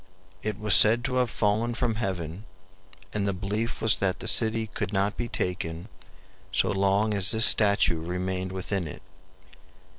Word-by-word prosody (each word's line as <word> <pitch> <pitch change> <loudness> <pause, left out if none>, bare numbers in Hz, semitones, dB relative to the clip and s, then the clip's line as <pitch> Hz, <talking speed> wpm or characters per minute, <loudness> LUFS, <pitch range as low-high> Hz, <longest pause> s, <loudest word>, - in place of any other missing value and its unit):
It 105 -2 -4
was 105 -2 0
said 115 +4 +6
to 130 -1 -2
have 125 -2 +1
fallen 110 +3 -1
from 120 -1 -1
heaven, 95 -3 -5 0.7
and 100 -1 -2
the 100 - -1
belief 105 +5 -4
was 110 - +2
that 95 -1 -1
the 115 - -5
city 110 +1 +2
could 105 - -5
not 100 +1 -1
be 120 - -4
taken 90 -2 -4 0.6
so 95 - +1
long 100 +2 +1
as 100 -2 +2
this 110 0 +8
statue 100 -6 +4
remained 90 +1 -4
within 95 -1 -4
it. 75 - -11
100 Hz, 160 wpm, -26 LUFS, 95-110 Hz, 0.7 s, this